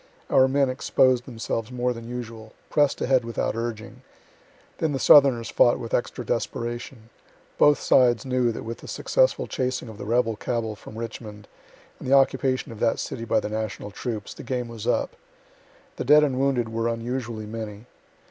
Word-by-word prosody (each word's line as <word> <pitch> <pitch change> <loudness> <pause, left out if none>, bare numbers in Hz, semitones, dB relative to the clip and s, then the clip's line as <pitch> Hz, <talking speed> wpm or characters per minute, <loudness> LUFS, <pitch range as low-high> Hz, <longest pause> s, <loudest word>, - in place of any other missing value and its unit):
Our 130 - +6
men 135 +1 +2
exposed 130 -1 +2
themselves 115 -2 -4
more 125 0 -1
than 115 0 -9
usual; 115 -3 -7 0.2
press'd 145 -2 +2
ahead 130 -1 +3
without 115 -1 -2
urging. 115 -1 -5 0.8
Then 155 -2 0
the 135 - -2
southerners 130 -6 +6
fought 120 - +4
with 115 - -7
extra 120 0 -1
desperation. 120 0 -4 0.5
Both 145 0 +5
sides 120 -1 +3
knew 125 -2 +1
that - - -6
with 115 +1 -6
the - - -12
successful - - +1
chasing 130 -2 -3
of 110 -1 -11
the - - -6
rebel 115 0 +1
cabal 110 0 -3
from 105 +1 -12
Richmond, 110 -2 -7 0.5
and - - -8
the 135 - +6
occupation 135 -2 +2
of 110 - -10
that 115 -1 +2
city 115 - -5
by - - +2
the - - -4
national 110 -1 -4
troops, 110 -1 -5
the - - -10
game 125 -1 -3
was 115 -3 -7
up. - - 0 0.8
The - - -2
dead 150 +3 +6
and 130 -3 0
wounded 130 -4 +1
were 115 +1 -1
unusually 115 -1 -3
many. 110 0 -7
120 Hz, 175 wpm, -25 LUFS, 115-130 Hz, 0.8 s, Our